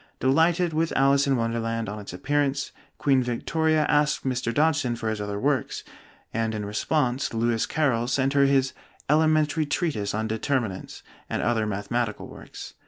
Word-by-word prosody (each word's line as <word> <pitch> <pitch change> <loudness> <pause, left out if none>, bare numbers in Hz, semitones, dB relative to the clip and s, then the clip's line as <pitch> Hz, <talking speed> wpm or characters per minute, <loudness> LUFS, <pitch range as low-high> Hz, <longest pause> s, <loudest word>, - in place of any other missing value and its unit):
Delighted 165 +5 +2
with 160 +1 0
'Alice 140 +1 +4
in 135 -2 +2
Wonderland' 115 -1 -1
on 105 +1 -5
its 100 - -8
appearance, 140 +7 -1 0.3
Queen 135 -2 +3
Victoria 155 +6 +1
asked 150 -1 +2
Mr. 125 -2 -1
Dodgson 145 -3 +1
for 115 -1 -3
his 110 -1 -3
other 100 0 -3
works; 140 +3 -1 0.5
and 115 0 -1
in 105 -1 -3
response 125 +4 -1
"Lewis 115 0 +1
Carroll" 130 -7 +1
sent 135 +1 +1
her 140 -1 +5
his 135 -1 +2 0.4
'Elementary 155 0 +3
Treatise 115 - -1
on 110 +1 -1
Determinants' 110 -3 -2 0.3
and - - -2
other 110 -2 +1
mathematical 105 +2 -2
works. - - -10
130 Hz, 155 wpm, -25 LUFS, 115-145 Hz, 0.5 s, her